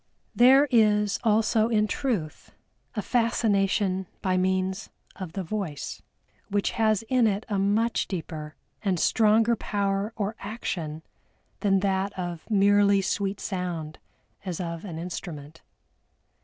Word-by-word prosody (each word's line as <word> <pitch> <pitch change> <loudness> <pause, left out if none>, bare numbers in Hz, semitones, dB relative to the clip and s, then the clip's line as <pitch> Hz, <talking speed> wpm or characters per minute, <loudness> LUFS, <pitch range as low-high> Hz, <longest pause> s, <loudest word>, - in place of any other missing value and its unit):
There 265 +4 +6
is 210 -3 +3
also 220 0 +3
in 215 -2 +3
truth 215 - -3 0.4
a 210 - -2
Fascination 200 -5 +1 0.2
by 185 -1 +1
means 185 +2 0 0.3
of 185 -5 -7
the 195 - -3
Voice, 175 -6 -4 0.5
which 200 0 0
has 215 -2 +1
in 240 0 +2
it 205 0 -1
a 200 -2 0
much 215 +4 +1
deeper 155 -4 -6 0.3
and 190 -5 0
stronger 225 +4 +4
power 200 0 -1
or 210 +1 -2
action 170 -7 -5 0.6
than 195 -2 +2
that 195 0 -1
of 175 -1 -5
merely 200 -1 +4
sweet 195 +1 -1
sound 175 -5 -4 0.4
as 180 -4 -4
of 170 0 -5
an 170 -5 -6
instrument. 165 -3 -7
200 Hz, 125 wpm, -26 LUFS, 180-215 Hz, 0.6 s, There